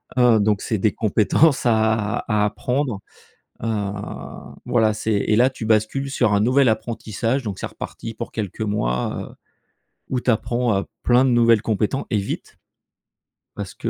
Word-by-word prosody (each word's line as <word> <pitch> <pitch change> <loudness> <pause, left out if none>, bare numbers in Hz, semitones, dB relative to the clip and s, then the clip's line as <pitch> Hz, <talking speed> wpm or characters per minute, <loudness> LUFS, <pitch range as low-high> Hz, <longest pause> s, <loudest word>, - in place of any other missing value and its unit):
heu, 125 -3 +5
donc 105 -1 +1
c'est 110 - -1
des 105 +1 +1
compétences 115 +8 +2
à 110 -2 +2
à 105 -1 +2
apprendre, 125 +1 -1 0.6
heu 105 -3 -1 0.7
voilà, 110 -3 +2
c'est 110 +1 -3
et 105 +1 +1
là 125 +3 +5
tu 120 - -7
bascules 110 +5 +1
sur 120 -5 +1
un 100 - +3
nouvel 130 +5 +3
apprentissage, 115 +3 -2
donc 100 -4 -5
c'est - - -3
reparti 115 - -7
pour 115 - -6
quelques 105 -2 -5
mois, 60 - -2
heu, - - -18 0.8
où 130 -1 0
tu 125 - +1
apprends, 120 0 0
heu, - - -5 0.2
plein 125 +1 +4
de 130 - +3
nouvelles 115 -2 +4
compéten 110 +4 -1
et 110 - +1
vite 100 - -5 1.0
parce - - -6
que - - -3
110 Hz, 165 wpm, -22 LUFS, 105-120 Hz, 1.0 s, heu